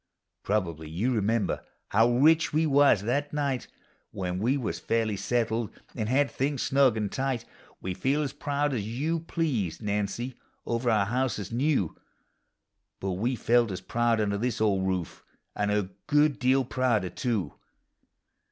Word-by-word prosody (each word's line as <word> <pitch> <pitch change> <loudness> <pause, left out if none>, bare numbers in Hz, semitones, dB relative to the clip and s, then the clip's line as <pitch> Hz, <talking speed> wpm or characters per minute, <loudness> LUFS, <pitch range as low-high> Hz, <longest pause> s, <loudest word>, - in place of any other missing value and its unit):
Probably 85 -7 -2
you 105 +11 0
remember 110 0 0 0.3
how 115 +3 +4
rich 155 +6 +4
we 155 +2 +2
was 140 -8 +4
that 140 +6 -1
night. 140 -4 -1 0.4
When 90 -1 -3
we 125 +7 +2
was 125 -5 -3
fairly 115 -2 0
settled, 115 +2 0 0.2
an' 110 -2 -3
had 135 +4 +2
things 140 0 -1
snug 135 -4 +3
and 105 -2 -2
tight: 130 -3 -2 0.4
We 95 - -3
feel 140 +10 0
as 140 - -3
proud 145 0 -1
as 115 -5 -1
you 140 +10 -1
please, 145 - -2
Nancy, 105 +4 -2 0.3
over 120 +1 0
our 105 -3 +3
house 125 +2 0
that 105 - -4
's 95 - -10
new, 125 - +1 1.0
Jtut 95 -1 -2
we 120 +6 0
felt 120 0 +3
as 95 -2 -4
proud 120 -1 +1
under 100 -1 0
this 120 0 -1
old 100 -3 +2
roof, 90 -3 -3 0.3
and 105 0 0
a 105 -2 0 0.2
good 150 -1 +3
deal 130 +1 +3
prouder, 120 -8 0
too. 105 - -2
115 Hz, 160 wpm, -28 LUFS, 105-135 Hz, 1.0 s, how